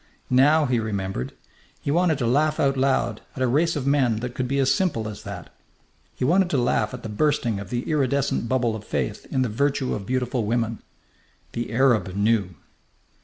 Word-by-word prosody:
Now 145 Hz, +5 st, +5 dB
he 125 Hz, -3 st, +1 dB
remembered. 95 Hz, -, -3 dB, 0.5 s
He 140 Hz, -, -2 dB
wanted 170 Hz, -1 st, +2 dB
to 125 Hz, -, -1 dB
laugh 150 Hz, +6 st, +2 dB
out 135 Hz, -1 st, +2 dB
loud 135 Hz, 0 st, +1 dB
at 130 Hz, -, -5 dB
a -, -, +3 dB
race 160 Hz, +7 st, +2 dB
of 140 Hz, -3 st, -3 dB
men 135 Hz, -5 st, +3 dB
that 125 Hz, 0 st, -4 dB
could 130 Hz, 0 st, -2 dB
be 140 Hz, +2 st, -1 dB
as 135 Hz, -1 st, +3 dB
simple 135 Hz, -, 0 dB
as 105 Hz, -1 st, -7 dB
that. 100 Hz, -5 st, -8 dB, 0.6 s
He 125 Hz, -, -1 dB
wanted 180 Hz, +5 st, +3 dB
to 145 Hz, -, +1 dB
laugh 120 Hz, -3 st, +1 dB
at 125 Hz, -, -11 dB
the -, -, -4 dB
bursting 115 Hz, -1 st, 0 dB
of 100 Hz, -2 st, -8 dB
the 120 Hz, +1 st, -2 dB
iridescent 140 Hz, -5 st, 0 dB
bubble 120 Hz, -3 st, +1 dB
of 110 Hz, -, -7 dB
faith 70 Hz, -, -3 dB
in 130 Hz, -, +1 dB
the -, -, 0 dB
virtue 135 Hz, +4 st, 0 dB
of 100 Hz, -2 st, -5 dB
beautiful 125 Hz, -1 st, -1 dB
women. 115 Hz, 0 st, -1 dB, 0.7 s
The 120 Hz, 0 st, -4 dB
Arab 115 Hz, -7 st, +2 dB
knew! 100 Hz, -3 st, +1 dB
125 Hz, 195 wpm, -24 LUFS, 110-140 Hz, 0.7 s, Now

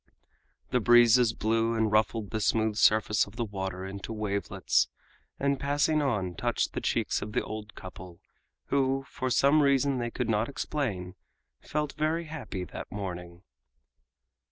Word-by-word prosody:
The 125 Hz, -, +3 dB
breezes 120 Hz, 0 st, +6 dB
blew 115 Hz, +1 st, 0 dB
and 110 Hz, -1 st, +1 dB
ruffled 110 Hz, -1 st, +1 dB
the 110 Hz, -, -2 dB
smooth 110 Hz, +1 st, +1 dB
surface 105 Hz, -1 st, +3 dB
of 100 Hz, -, -14 dB
the 120 Hz, -, -2 dB
water 95 Hz, -2 st, -5 dB
into 100 Hz, +3 st, -7 dB
wavelets, 100 Hz, -3 st, 0 dB, 0.5 s
and 140 Hz, -1 st, +1 dB
passing 145 Hz, +2 st, +1 dB
on 105 Hz, -10 st, -1 dB
touched -, -, -1 dB
the -, -, -3 dB
cheeks -, -, 0 dB
of 105 Hz, +1 st, -6 dB
the -, -, +1 dB
old 110 Hz, 0 st, -7 dB
couple 90 Hz, -1 st, -10 dB, 0.5 s
who, 135 Hz, -1 st, +1 dB
for 130 Hz, -2 st, -3 dB
some 140 Hz, +4 st, +4 dB
reason 140 Hz, -1 st, +2 dB
they 120 Hz, 0 st, -2 dB
could 125 Hz, 0 st, -3 dB
not 110 Hz, +1 st, +1 dB
explain, 110 Hz, -12 st, -3 dB, 0.5 s
felt 150 Hz, -1 st, -2 dB
very 155 Hz, +2 st, 0 dB
happy 150 Hz, -, -6 dB
that 90 Hz, -, -8 dB
morning. 90 Hz, -3 st, -6 dB
110 Hz, 150 wpm, -28 LUFS, 100-135 Hz, 0.5 s, breezes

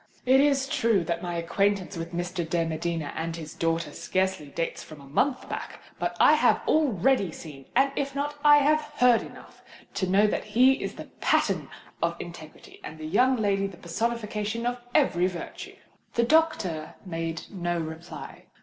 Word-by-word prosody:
It 260 Hz, +1 st, +6 dB
is 275 Hz, -1 st, +3 dB
true 225 Hz, -8 st, +2 dB
that 170 Hz, 0 st, -2 dB
my 175 Hz, -1 st, -4 dB
acquaintance 195 Hz, +3 st, 0 dB
with 165 Hz, 0 st, -5 dB
Mr. 175 Hz, +1 st, -3 dB
de 170 Hz, -1 st, +1 dB
Medina 165 Hz, -1 st, -3 dB
and 165 Hz, 0 st, -3 dB
his 160 Hz, -2 st, -8 dB
daughter 165 Hz, 0 st, -1 dB
scarcely 190 Hz, -4 st, -1 dB
dates 165 Hz, +4 st, -3 dB
from 155 Hz, -2 st, -12 dB
a 140 Hz, -, -13 dB
month 255 Hz, -, 0 dB
back; -, -, -6 dB, 0.2 s
but -, -, -2 dB
I -, -, +7 dB
have -, -, +4 dB
already 260 Hz, -, +2 dB
seen—and 160 Hz, -, -1 dB
if 275 Hz, -1 st, -2 dB
not, 290 Hz, +1 st, -1 dB
I 295 Hz, 0 st, +8 dB
have 305 Hz, +2 st, +4 dB, 0.2 s
heard 250 Hz, -2 st, +5 dB
enough -, -, -12 dB
of -, -, -26 dB
them, -, -, -19 dB
to 185 Hz, -, -1 dB
know 200 Hz, +3 st, +5 dB
that 210 Hz, -, 0 dB
he 255 Hz, +6 st, +4 dB
is -, -, -4 dB
the -, -, -8 dB, 0.2 s
pattern -, -, +1 dB, 0.3 s
of 170 Hz, 0 st, +1 dB
integrity 170 Hz, -3 st, -11 dB
and 155 Hz, -, -8 dB
the 155 Hz, -, -7 dB
young 250 Hz, +11 st, +3 dB
lady 200 Hz, -3 st, +1 dB
the 190 Hz, -3 st, -11 dB
personification 215 Hz, +4 st, -2 dB
of 245 Hz, 0 st, -1 dB, 0.2 s
every 185 Hz, -, +3 dB
virtue." 180 Hz, -2 st, -7 dB, 0.4 s
The 235 Hz, -, +3 dB
doctor 235 Hz, -, +1 dB
made 165 Hz, -2 st, -4 dB
no 175 Hz, -3 st, -2 dB
reply. 160 Hz, +1 st, -8 dB
185 Hz, 175 wpm, -27 LUFS, 165-245 Hz, 0.4 s, I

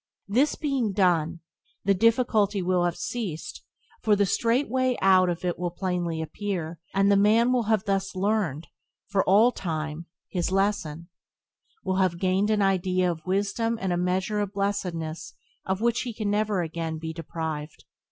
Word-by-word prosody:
This 255 Hz, +9 st, +2 dB
being 270 Hz, -9 st, -1 dB
done, 170 Hz, -4 st, +1 dB, 0.4 s
the 200 Hz, -, +4 dB
difficulty 215 Hz, -2 st, +2 dB
will 180 Hz, -1 st, +2 dB
have 175 Hz, -1 st, 0 dB
ceased, 165 Hz, -10 st, -5 dB, 0.4 s
for 215 Hz, -2 st, +3 dB
the 200 Hz, 0 st, +2 dB
straight 235 Hz, +7 st, +1 dB
way 255 Hz, +1 st, +1 dB
out 185 Hz, -1 st, +5 dB
of 175 Hz, +1 st, -3 dB
it 175 Hz, -1 st, -1 dB
will 180 Hz, -1 st, -1 dB
plainly 175 Hz, -2 st, -2 dB
appear, 170 Hz, -1 st, -4 dB, 0.2 s
and 195 Hz, +1 st, +4 dB
the -, -, +5 dB
man 220 Hz, +5 st, +4 dB
will 240 Hz, -4 st, +1 dB, 0.2 s
thus 195 Hz, -1 st, 0 dB
have -, -, -4 dB
learned, 190 Hz, -7 st, 0 dB, 0.4 s
for 195 Hz, -1 st, +2 dB
all 215 Hz, +6 st, +5 dB
time, 160 Hz, -4 st, -4 dB, 0.2 s
his 180 Hz, -1 st, -2 dB
lesson; 190 Hz, -4 st, -1 dB, 0.7 s
will 185 Hz, 0 st, -1 dB
have 185 Hz, -3 st, +2 dB
gained 190 Hz, +3 st, +1 dB
an 210 Hz, -2 st, +2 dB
item 185 Hz, -1 st, +2 dB
of 165 Hz, 0 st, -8 dB
wisdom 205 Hz, +4 st, 0 dB
and 190 Hz, -2 st, -1 dB
a -, -, +1 dB
measure 185 Hz, +4 st, 0 dB
of 205 Hz, -1 st, -2 dB
blessedness 180 Hz, -5 st, -3 dB, 0.3 s
of 190 Hz, +1 st, -1 dB
which 235 Hz, 0 st, +2 dB
he 240 Hz, -3 st, -5 dB
can 215 Hz, -2 st, -1 dB
never 205 Hz, -3 st, +1 dB
again 160 Hz, 0 st, -4 dB
be 160 Hz, 0 st, -5 dB
deprived. 160 Hz, -2 st, -5 dB
190 Hz, 165 wpm, -26 LUFS, 170-210 Hz, 0.7 s, out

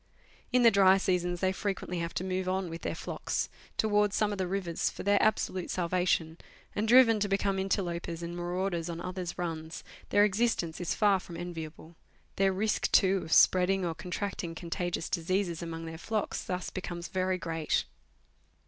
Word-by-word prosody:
In 250 Hz, -1 st, +4 dB
the 230 Hz, -, +8 dB
dry 195 Hz, -2 st, +6 dB
seasons, 180 Hz, -2 st, 0 dB
they 185 Hz, -1 st, +2 dB
frequently 190 Hz, -3 st, -3 dB
have 170 Hz, 0 st, -4 dB
to -, -, -1 dB
move 185 Hz, 0 st, -2 dB
on 185 Hz, -2 st, -1 dB
with 165 Hz, -, -6 dB
their -, -, -3 dB
flocks -, -, -3 dB, 0.3 s
towards 210 Hz, -1 st, +2 dB
some 210 Hz, -1 st, +2 dB
of 205 Hz, -, -4 dB
the 185 Hz, -, 0 dB
rivers 180 Hz, -3 st, -1 dB
for -, -, -8 dB
their 205 Hz, +1 st, +3 dB
absolute 195 Hz, -4 st, +1 dB
salvation, 175 Hz, -2 st, 0 dB, 0.4 s
and, 210 Hz, +2 st, 0 dB
driven 230 Hz, -2 st, +7 dB
to 205 Hz, 0 st, 0 dB
become 195 Hz, 0 st, +1 dB
interlopers 175 Hz, -3 st, -2 dB
and 170 Hz, +1 st, -5 dB
marauders 175 Hz, -1 st, -2 dB
on 170 Hz, 0 st, -4 dB
others' 180 Hz, 0 st, -5 dB
runs, 165 Hz, -2 st, -4 dB, 0.3 s
their 205 Hz, 0 st, +5 dB
existence 200 Hz, -6 st, 0 dB
is 175 Hz, -, -1 dB
far 205 Hz, -3 st, +4 dB
from 170 Hz, -2 st, -9 dB
enviable; 165 Hz, -1 st, -7 dB, 0.4 s
their 195 Hz, 0 st, +3 dB
risk, 210 Hz, +3 st, 0 dB
too, 195 Hz, 0 st, +5 dB
of 160 Hz, -, -9 dB
spreading 185 Hz, +2 st, +5 dB
or 170 Hz, -, -1 dB
con 180 Hz, -, -9 dB
tracting 180 Hz, -3 st, -3 dB
contagious 175 Hz, 0 st, -3 dB
diseases 180 Hz, 0 st, -1 dB
among 165 Hz, -1 st, -5 dB
their 160 Hz, 0 st, -7 dB
flocks 215 Hz, +2 st, -2 dB
thus 180 Hz, 0 st, -4 dB
becomes 175 Hz, -2 st, -5 dB
very 185 Hz, 0 st, 0 dB
great. 165 Hz, -2 st, -1 dB
185 Hz, 175 wpm, -30 LUFS, 170-195 Hz, 0.4 s, the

